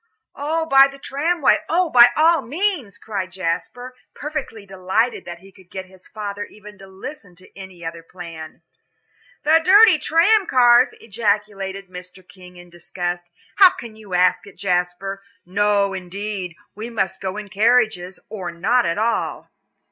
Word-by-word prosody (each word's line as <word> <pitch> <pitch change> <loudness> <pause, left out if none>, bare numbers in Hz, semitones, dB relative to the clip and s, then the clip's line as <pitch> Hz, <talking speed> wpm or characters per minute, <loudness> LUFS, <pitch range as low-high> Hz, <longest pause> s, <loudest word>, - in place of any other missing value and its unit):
"Oh, 320 +3 -2
by 275 -3 +6
the 275 0 -12
tramway; 295 +3 +1
oh, 345 +1 +1
by 245 -1 +8
all 325 0 +4
means," 290 - -2
cried 195 -4 -5
Jasper, 190 +8 -4 0.2
perfectly 290 -8 -6
delighted 195 +5 -1
that 170 0 -9
he 195 +1 -16
could 190 -2 -20
get 190 -1 -7
his 185 0 -18
father 205 -1 -6
even 210 0 -15
to 195 - -13
listen 195 0 -10
to 185 +1 -18
any 190 -3 -11
other 165 0 -6
plan. 165 -2 -11 0.8
"The 320 +2 +4
dirty 395 -2 +7
tram 370 +7 +3
cars," 245 -1 +5
ejaculated 200 -3 -3
Mr. 180 0 -12
King, 180 0 -15
in 175 0 -15
disgust. 175 0 -5 0.3
"How 380 -2 +9
can 230 -2 -10
you 210 -4 -7
ask 180 +2 +2
it, 200 - -15
Jasper? 180 +1 -2 0.2
No, 200 +1 +1
indeed, 190 -1 -6 0.2
we 220 +3 -7
must 195 -6 -2
go 190 +1 -4
in 210 -1 -7
carriages, 215 -4 +1
or 190 -6 -6
not 225 +9 +1
at 170 - -1
all." 225 +2 -2
200 Hz, 155 wpm, -21 LUFS, 185-245 Hz, 0.8 s, How